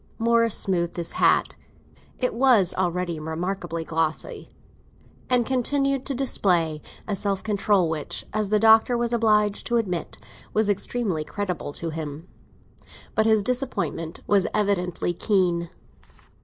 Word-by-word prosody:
Morris 230 Hz, -1 st, +2 dB
smoothed 175 Hz, -3 st, 0 dB
his 170 Hz, -1 st, -3 dB
hat—it 250 Hz, -, -1 dB
was 230 Hz, -7 st, +4 dB
already 180 Hz, -2 st, -1 dB
remarkably 165 Hz, +1 st, -3 dB
glossy—and 165 Hz, +9 st, -4 dB
continued 275 Hz, +1 st, 0 dB
to 275 Hz, -, -2 dB
display 175 Hz, -, +1 dB, 0.3 s
a 210 Hz, -, -1 dB
self 195 Hz, 0 st, -1 dB
control 205 Hz, -3 st, +2 dB
which, 160 Hz, -2 st, -4 dB
as 215 Hz, -2 st, -1 dB
the 215 Hz, -, +3 dB
Doctor 225 Hz, +3 st, +5 dB
was 240 Hz, 0 st, -1 dB
obliged 210 Hz, -3 st, +2 dB
to 240 Hz, -, +1 dB
admit, 180 Hz, -7 st, -2 dB, 0.4 s
was 215 Hz, -1 st, +2 dB
extremely 200 Hz, -4 st, 0 dB
creditable 180 Hz, -1 st, -4 dB
to 165 Hz, +2 st, -2 dB
him. 155 Hz, +1 st, -6 dB, 0.9 s
But 220 Hz, 0 st, +2 dB
his 220 Hz, -2 st, +3 dB
disappointment 245 Hz, -, -3 dB
was 200 Hz, -2 st, +3 dB
evidently 180 Hz, -4 st, 0 dB
keen. 175 Hz, -3 st, +1 dB
200 Hz, 120 wpm, -24 LUFS, 170-230 Hz, 0.9 s, Doctor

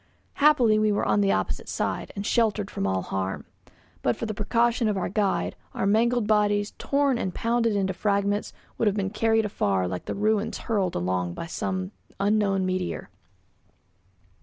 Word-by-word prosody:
Happily 250 Hz, -8 st, +5 dB
we 215 Hz, 0 st, +3 dB
were 205 Hz, -, 0 dB
on 205 Hz, -, +2 dB
the 195 Hz, -1 st, +3 dB
opposite -, -, -2 dB
side, -, -, -2 dB
and 200 Hz, 0 st, -4 dB
sheltered 215 Hz, -3 st, +1 dB
from 95 Hz, -, -2 dB
all 95 Hz, -1 st, 0 dB
harm. 95 Hz, 0 st, -3 dB, 0.6 s
But 120 Hz, -, +1 dB
for -, -, -4 dB
the 215 Hz, -, -3 dB
precaution 230 Hz, +3 st, +1 dB
of 210 Hz, -2 st, 0 dB
our 185 Hz, -, -1 dB
guide, 200 Hz, 0 st, 0 dB, 0.2 s
our -, -, -1 dB
mangled 230 Hz, +3 st, +2 dB
bodies, 205 Hz, -1 st, +2 dB
torn 280 Hz, -3 st, +1 dB
and 185 Hz, -, -3 dB
pounded 230 Hz, -1 st, +1 dB
into 190 Hz, -1 st, 0 dB
fragments, 200 Hz, +1 st, 0 dB, 0.3 s
would 225 Hz, -, +2 dB
have 205 Hz, -, +2 dB
been 195 Hz, -1 st, -1 dB
carried 225 Hz, 0 st, +2 dB
afar 95 Hz, -, 0 dB
like 90 Hz, 0 st, -5 dB
the -, -, -3 dB
ruins 215 Hz, +1 st, 0 dB
hurled 195 Hz, -6 st, -1 dB
along 90 Hz, -1 st, -1 dB
by -, -, -5 dB
some 185 Hz, +2 st, -3 dB, 0.3 s
unknown 200 Hz, -2 st, +2 dB
meteor. 185 Hz, -1 st, -3 dB
205 Hz, 170 wpm, -26 LUFS, 185-220 Hz, 0.6 s, Happily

